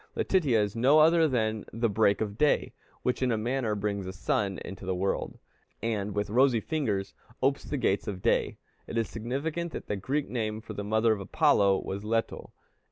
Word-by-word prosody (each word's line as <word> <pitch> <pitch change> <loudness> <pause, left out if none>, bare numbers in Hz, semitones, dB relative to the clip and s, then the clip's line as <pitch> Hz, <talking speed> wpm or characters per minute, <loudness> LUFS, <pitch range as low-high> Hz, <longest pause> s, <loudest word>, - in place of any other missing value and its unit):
Letitia 145 - +2
is 105 0 -1
no 130 +6 +5
other 160 +1 +6
than 110 -5 0
the 115 +1 0
break 105 -1 +2
of 105 -2 -2
day, 150 +5 +2 0.3
which 125 - 0
in 130 -1 +2
a 115 - +1
manner 115 -1 -1
brings 100 -2 -2
the 95 - -5
sun 95 +1 -1
into 95 0 -8
the 95 -1 -1
world, 95 +2 -2 0.4
and 105 -3 -2
"with 105 0 -1
rosy 125 0 +4
fingers 110 -9 -2 0.3
opes 135 +1 +1
the 145 - -3
gates 100 -6 0
of 95 -3 -5
Day." - - +1 0.3
It - - -4
is 115 - +1
significant 150 +9 -3
that - - -6
the 105 - -2
Greek 135 +9 -2
name 110 -3 -2
for 110 -1 -9
the 100 - -5
mother 110 +2 +2
of 105 - -4
Apollo 100 0 +3
was 100 +1 -4
Leto. 115 +1 -2
110 Hz, 195 wpm, -28 LUFS, 100-130 Hz, 0.4 s, other